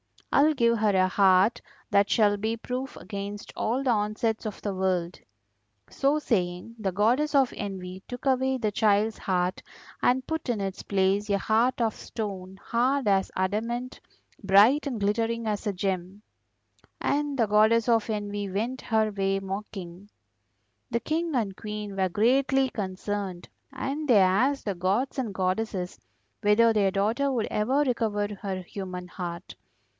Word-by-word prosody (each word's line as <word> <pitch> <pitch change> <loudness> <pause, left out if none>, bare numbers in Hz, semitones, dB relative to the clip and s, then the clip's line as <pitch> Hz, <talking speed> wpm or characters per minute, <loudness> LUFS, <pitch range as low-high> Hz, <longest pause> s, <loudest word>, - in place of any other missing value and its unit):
I 280 - +6
will 310 +1 +4
give 235 -3 +2
her 210 -2 +2
a 185 0 +3
heart 190 +3 +4 0.3
that 200 0 +4
shall 205 -2 +3
be 220 +3 -1
proof 255 +3 -5
against 200 0 -7
all 245 +5 -1
the 260 - +2
onsets 215 +1 -1
of 215 - -5
the 205 - -2
world.' 185 -2 -1 0.7
So 280 +2 +1
saying 185 -4 -2
the 195 -3 -2
Goddess 250 +10 +2
of 270 -3 +4
Envy 190 -2 -6
took 245 +2 -8
away 265 0 +2
the 220 -4 -1
child's 210 +1 +2
heart 180 -1 -1 0.4
and 255 +1 +2
put 320 -2 -3
in 225 -4 0
its 195 -1 -4
place 200 +1 +1
a 200 - +3
heart 230 +5 +1
of 225 -2 +1
stone, 195 -4 -6
hard 255 +1 +1
as 195 -1 +2
adamant, 230 +7 -2 0.4
bright 215 +9 +5
and 240 -6 -3
glittering 225 +3 0
as 210 0 -2
a 205 - 0
gem. 190 +1 -3 0.8
And 290 -1 0
the 230 - +3
Goddess 220 +3 +4
of 225 -1 +2
Envy 205 -1 -3
went 230 +7 -2
her 220 -2 +1
way 195 -1 0
mocking. 195 -1 -7 0.8
The 235 - -1
King 320 0 -1
and 210 -6 -1
Queen 210 -2 -6
were 190 -1 +1
greatly 265 +6 +2
concerned, 195 -3 -4 0.2
and 280 +3 -3
they 240 -5 +6
asked 240 +10 +2
the 200 -3 -1
gods 200 +11 0
and 230 -6 -2
goddesses 185 0 -2 0.4
whether 225 +2 +5
their 205 -3 +3
daughter 220 +9 0
would 235 -4 -1
ever 255 +7 +1
recover 220 -6 0
her 190 -2 -3
human 180 -1 -7
heart. 170 -2 -6
210 Hz, 155 wpm, -27 LUFS, 195-240 Hz, 0.8 s, I